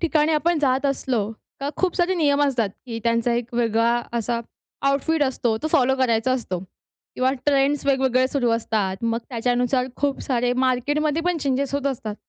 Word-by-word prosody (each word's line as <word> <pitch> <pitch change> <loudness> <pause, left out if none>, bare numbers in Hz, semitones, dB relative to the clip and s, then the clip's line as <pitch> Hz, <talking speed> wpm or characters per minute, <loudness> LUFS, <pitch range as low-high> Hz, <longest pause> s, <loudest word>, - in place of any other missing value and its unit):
ठिकाणी 315 -2 +2
आपण 325 +2 +2
जात 270 -1 +1
असलो, 245 -6 -1 0.3
तर 280 - -2
खूप 370 -2 0
सारे 360 +1 +2
नियम 290 -4 +2
असतात, 245 -7 +1 0.2
की 230 -2 -4
त्यांचा 230 +1 +2
एक 240 0 -3
वेगळा 235 0 +2 0.2
असा 235 +1 -1 0.5
आउटफिट 290 +3 +1
असतो. 245 -4 0
तो 310 - 0
फॉलो 265 0 +4
करायचा 250 -1 +2
असतो. 230 -8 -2 0.6
किंवा 255 +1 +2 0.2
ट्रेंड्स 280 0 +2
वेगवेगळे 265 -2 +3
सुरू 255 -5 0
असतात. 220 -4 0
मग 230 0 +1
त्याच्यानुसार 245 +1 0
खूप 280 -1 -1
सारे 245 -2 0
मार्केटमध्ये 290 +5 0
पण 355 0 +1
चेंजेस 275 -1 -1
होत 280 0 -1
असतात. 230 -6 -3
260 Hz, 165 wpm, -23 LUFS, 235-285 Hz, 0.6 s, फॉलो